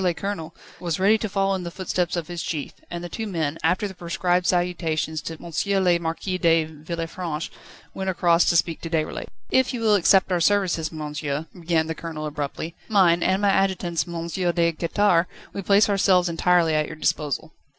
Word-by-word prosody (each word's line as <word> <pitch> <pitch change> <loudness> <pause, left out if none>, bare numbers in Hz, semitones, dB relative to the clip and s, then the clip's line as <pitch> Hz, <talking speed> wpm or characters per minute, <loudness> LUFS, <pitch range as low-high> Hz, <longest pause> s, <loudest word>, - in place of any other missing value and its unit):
le 175 -2 +1
Colonel, 170 -5 -5 0.2
was 170 -2 -2
ready 200 +3 +5
to 220 -1 -2
follow 195 0 +1
in 190 - -2
the 175 - -5
footsteps 180 -1 -2
of 170 -3 -3
his 175 -1 -5
chief, 150 -4 -4 0.2
and 175 0 -5
the - - -4
two 220 +5 -5
men, 160 -5 -2
after 180 +5 +1
the 195 - -9
prescribed 175 0 0
salutations 165 -3 0
to 165 - -5
M. 190 +4 -1
le 175 -2 +3
Marquis 170 +3 -3
de 165 -2 +4
Villefranche, 165 +1 -5 0.4
went 190 0 -3
across 170 -1 +3
to 170 - +2
speak 165 -1 +1
to 165 - -5
Déroulède. 160 -2 -2 0.2
"If 260 0 +2
you 235 - -4
will 220 -2 +4
accept 195 -1 +4
our 175 -1 +1
services, 175 -4 +2
monsieur," 150 -1 -4
began 165 -2 0
the 160 - -3
Colonel 160 -2 -6
abruptly, 150 +2 -4 0.2
"mine, 180 -5 +4
and 190 +3 +1
my 200 - +4
adjutant's, 185 -4 0
M. 170 -1 -4
de 170 -1 +1
Quettare, 170 +1 +2 0.3
we 200 - -4
place 200 +2 +4
ourselves 190 -3 +3
entirely 170 -1 +3
at 155 0 +1
your 155 - -7
disposal." 155 0 -1
170 Hz, 190 wpm, -24 LUFS, 160-190 Hz, 0.4 s, ready